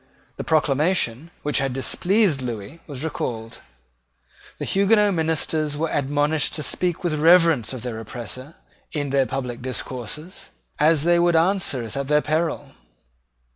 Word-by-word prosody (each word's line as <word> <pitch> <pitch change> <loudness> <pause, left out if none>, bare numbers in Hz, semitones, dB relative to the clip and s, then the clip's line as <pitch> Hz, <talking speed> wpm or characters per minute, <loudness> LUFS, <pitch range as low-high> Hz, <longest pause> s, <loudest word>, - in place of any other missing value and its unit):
The - - -4
proclamation 150 -2 +1
which 150 -1 +1
had 135 -1 -1
displeased 175 - +2
Lewis 115 +3 -6
was 140 -2 -6
recalled. 115 -7 -4 1.0
The - - -4
Huguenot 205 +1 +3
ministers 160 -2 -1
were 160 +1 -1
admonished 145 +2 +1
to 150 - -3
speak 180 +2 -1
with 175 -3 0
reverence 160 -6 +4
of 130 -3 -6
their 120 -3 -4
oppressor 120 - -8 0.4
in 145 -3 -2
their 135 -1 +2
public 125 -3 -4
discourses, 130 - -5 0.3
as 155 0 +4
they 170 +1 +4
would 175 0 +3
answer 165 -6 +2
it 110 -2 -5
at 140 0 -2
their 150 +1 +3
peril. 155 -2 -1
150 Hz, 140 wpm, -23 LUFS, 130-165 Hz, 1.0 s, reverence